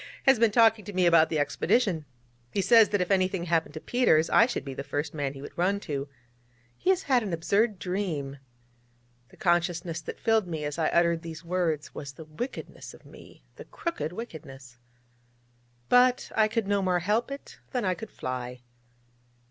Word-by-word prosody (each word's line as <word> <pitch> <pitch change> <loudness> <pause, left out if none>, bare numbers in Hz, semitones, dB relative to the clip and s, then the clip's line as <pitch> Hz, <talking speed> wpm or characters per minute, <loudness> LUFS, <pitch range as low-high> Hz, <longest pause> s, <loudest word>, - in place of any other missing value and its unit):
ha! 270 - +1
has 260 - 0
been 230 -1 +5
talking 225 -1 +4
to 205 +1 -8
me 185 -1 +2
about 165 -2 +5
the 155 - -1
Expedition. 165 +3 +1 0.5
He - - -2
says 220 +3 +6
that 205 -2 0
if 180 - -1
anything 185 -2 +1
happened 165 -3 0
to - - -4
Peters, 165 -8 +2
I 230 - +6
should 240 - -4
be 135 - -5
the 140 - -5
first 145 +2 -3
man 140 -3 -2
he 135 - -9
would - - -10
run 190 +4 +1
to. 140 -4 -4 0.7
He 365 - -2
has 380 0 +3
had 260 -3 +3
an 200 -5 -4
absurd 200 +6 +1
dream...' 175 -8 -3 0.9
The - - -19
consciousness 175 -1 0
that - - -8
filled 225 -4 +2
me 160 -3 -4
as 145 +2 -4
I 160 - +2
uttered 170 -1 +2
these 165 0 -9
words 170 -4 -1
was 140 -2 -7
the 160 - -11
wickedness 165 - -7
of - - -20
me - - -15
the - - -10
crooked 335 - -4
wickedness. 135 - -10 1.1
But 250 0 +4
I 220 -1 +4
could 225 0 -1
no 200 0 +1
more 185 -1 +1
help 210 +8 0
it 275 0 -9
than 250 -5 -1
I 185 - +2
could 220 +3 -8
fly. 125 -1 -5
180 Hz, 190 wpm, -27 LUFS, 155-220 Hz, 1.1 s, says